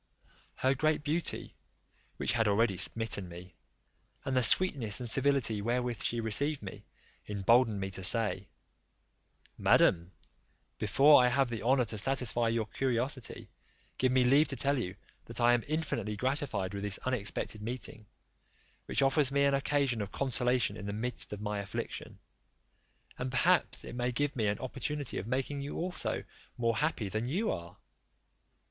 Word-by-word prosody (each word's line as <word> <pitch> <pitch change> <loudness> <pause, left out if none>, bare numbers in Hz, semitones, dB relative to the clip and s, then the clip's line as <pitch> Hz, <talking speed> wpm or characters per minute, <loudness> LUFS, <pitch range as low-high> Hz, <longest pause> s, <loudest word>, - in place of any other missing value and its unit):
Her 130 +1 +1
great 155 +2 0
beauty, 160 +3 0 0.6
which - - +1
had 115 -2 +1
already 105 0 +2
smitten 100 0 +1
me, 90 +2 -11 0.7
and 135 - -2
the 130 - +4
sweetness 120 - +3
and 125 - -1
civility 135 -4 +3
wherewith 120 +1 -2
she 120 - -1
received 135 +5 0
me, 95 - -10 0.4
emboldened 105 +2 +2
me 95 0 -4
to 95 0 -4
say, 105 -1 +4 1.1
"Madam, 85 -1 +3 0.7
before 135 +6 +5
I - - +4
have 125 0 +1
the 115 - -4
honour 125 +2 +2
to 110 -1 -2
satisfy 125 -1 +1
your 115 -1 0
curiosity, 130 +2 -3 0.5
give 130 0 +2
me 130 0 +3
leave 140 +5 +4
to 135 - -2
tell 140 +2 +1
you, 95 -6 -4 0.3
that - - -6
I 120 0 +4
am 120 -2 +1
infinitely 140 -9 -2
gratified 125 - -2
with 100 - -5
this 100 -1 -1
unexpected 110 -3 -1
meeting, 115 -1 -6 0.8
which - - +1
offers 135 0 +3
me 140 0 +2
an 140 - +2
occasion 140 -4 0
of 100 - -5
consolation 125 -4 0
in 100 -1 -7
the 100 - -3
midst 120 +4 -2
of 105 -1 -6
my 105 -1 -3
affliction; 100 -1 -6 1.0
and - - -3
perhaps - - +2
it - - -8
may 125 0 -1
give 145 +4 -1
me 110 -4 0
an 100 0 0
opportunity 135 +2 -4
of 100 - -7
making 135 +3 -2
you 140 +1 -6
also 180 +1 -2 0.3
more 115 -2 0
happy 150 -8 -1
than 110 +5 -3
you 190 - -1
are." 85 0 -7
120 Hz, 160 wpm, -31 LUFS, 105-135 Hz, 1.1 s, before